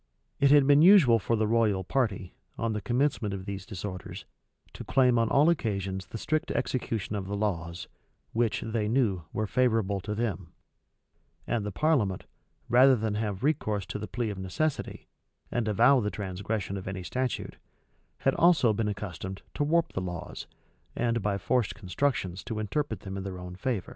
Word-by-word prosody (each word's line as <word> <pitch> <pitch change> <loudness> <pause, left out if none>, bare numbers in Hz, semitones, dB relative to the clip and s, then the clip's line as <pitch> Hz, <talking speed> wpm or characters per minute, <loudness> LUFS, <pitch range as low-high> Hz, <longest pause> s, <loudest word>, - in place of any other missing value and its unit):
It 140 - +5
had 145 -1 +6
been 145 +1 +6
usual 165 - +7
for 115 +3 0
the 110 0 +1
royal 105 -4 +2
party, 100 -5 -1 0.2
on 115 -1 -1
the 105 - -3
commencement 120 -3 0
of 95 -1 -7
these 100 -2 -6
disorders, 95 -3 -6 0.5
to - - -8
claim 125 -3 +3
on 115 -1 +2
all 145 +3 +4
occasions 100 - -1
the - - -6
strict 155 +7 -1
execution 110 -5 -2
of 95 -2 -4
the 100 +1 -3
laws, 85 -4 -3 0.5
which, 115 -1 +1
they 110 -1 -1
knew, 105 -8 +1
were 110 - -1
favorable 110 -4 +1
to 105 +2 -4
them; 105 -6 -3 0.9
and 115 -2 -1
the 105 - -3
parliament, 115 - +1 0.4
rather 130 +2 +6
than 110 -2 -1
have 105 -1 -3
recourse 110 - 0
to 90 +4 -5
the 105 - -5
plea 115 +1 -2
of 100 - -7
necessity, 135 +12 -3 0.4
and 120 -2 -1
avow 120 +6 +5
the 105 -3 -1
transgression 100 +1 -4
of 95 - -7
any 95 -1 -4
statute, 125 +7 -3 0.6
had 135 - +3
also 155 -10 +4
been 105 +1 -1
accustomed 95 -2 -5
to - - -1
warp 165 +3 +1
the 95 - -2
laws, 90 -2 -6 0.5
and 115 -1 0
by 100 0 0
forced 105 0 0
constructions 95 -2 -2
to 110 - -5
interpret 110 0 -2
them 95 0 -6
in 95 - -4
their 95 -1 -5
own 90 0 -8
favor. 105 0 -2
105 Hz, 175 wpm, -28 LUFS, 95-125 Hz, 0.9 s, usual